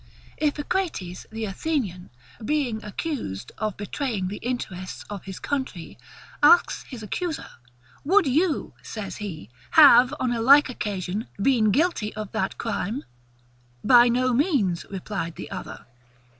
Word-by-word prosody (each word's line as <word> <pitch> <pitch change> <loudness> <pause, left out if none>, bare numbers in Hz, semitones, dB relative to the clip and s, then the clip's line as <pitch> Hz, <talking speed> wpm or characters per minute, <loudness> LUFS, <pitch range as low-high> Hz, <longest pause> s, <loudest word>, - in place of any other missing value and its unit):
Iphicrates, 295 - -2
the 220 0 -4
Athenian, 195 - -3 0.3
being 255 -4 -1
accused 205 - -4
of 215 -2 -2
betraying 205 -2 -3
the 205 - -5
interests 190 -7 -5
of 200 -3 -6
his 190 -1 -7
country, 260 - -4 0.5
asked 300 +4 +5
his 245 -5 -8
accuser, 320 - -3 0.6
WOULD 375 +5 +4
YOU, 305 +4 +1
says 210 -3 -6
he, 165 - -7 0.3
HAVE, 245 +2 +9
ON 255 -1 0
A 235 -1 -1
LIKE 280 +5 +7
OCCASION, 205 -1 -3
BEEN 220 -1 +3
GUILTY 280 - 0
OF 215 -2 -6
THAT 220 - -2
CRIME? 225 +2 -3 0.8
BY 245 -1 +7
NO 255 +1 +2
MEANS, 235 - +1
replied 190 -3 -4
the - - -8
other. - - -7
225 Hz, 130 wpm, -25 LUFS, 195-280 Hz, 0.8 s, HAVE